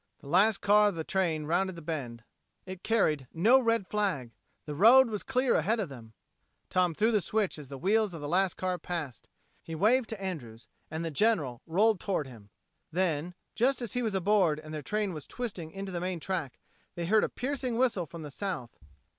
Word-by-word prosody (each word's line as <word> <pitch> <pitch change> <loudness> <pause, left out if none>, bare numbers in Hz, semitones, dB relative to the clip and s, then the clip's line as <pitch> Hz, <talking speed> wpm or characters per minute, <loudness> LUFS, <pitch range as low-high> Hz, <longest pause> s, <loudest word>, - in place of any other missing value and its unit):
The - - -15
last 195 +7 +3
car 210 +1 +5
of 200 - -1
the 160 - -3
train 165 -4 0
rounded 180 +4 0
the 170 - -9
bend. 125 -8 -5 0.4
It 185 -1 -8
carried 155 - +1
no 225 +11 +6
red 230 -4 +1
flag! 185 - -1 0.3
The 150 - -5
road 230 - +7
was 210 - -3
clear 260 -1 +1
ahead 215 +9 +1
of 195 -7 -2
them! 115 -5 -11 0.6
Tom 180 -3 +2
threw 220 +6 +2
the 210 -3 +2
switch 205 -1 -1
as 140 -3 -10
the 135 - -7
wheels 205 +6 +2
of - - -6
the 145 - -5
last 185 +3 +1
car 185 -1 -2
passed. 160 -7 -5 0.3
He 165 - -7
waved 230 +8 +3
to 220 - -5
Andrews 135 -13 -6 0.2
and 160 +2 -4
the 165 - -3
General 150 - +1
rolled 205 +5 +3
toward 185 -6 -1
him. 115 -6 -13 0.4
Then, 175 -1 -1 0.2
just 260 +4 +2
as 240 -5 -4
he 250 - 0
was 220 -4 -1
aboard 190 -4 +3
and 155 0 -9
their 155 - -4
train 210 +4 -1
was 155 -3 -8
twisting 195 -10 -5
into 195 +3 -6
the 175 -1 -3
main 180 -1 -2
track, 160 -6 -3 0.4
they 170 - -3
heard 215 +5 +4
a - - 0
piercing 255 -2 -3
whistle 235 -9 +1
from 165 +2 -9
the 150 - -7
south. 150 -9 -5
185 Hz, 205 wpm, -30 LUFS, 155-215 Hz, 0.6 s, road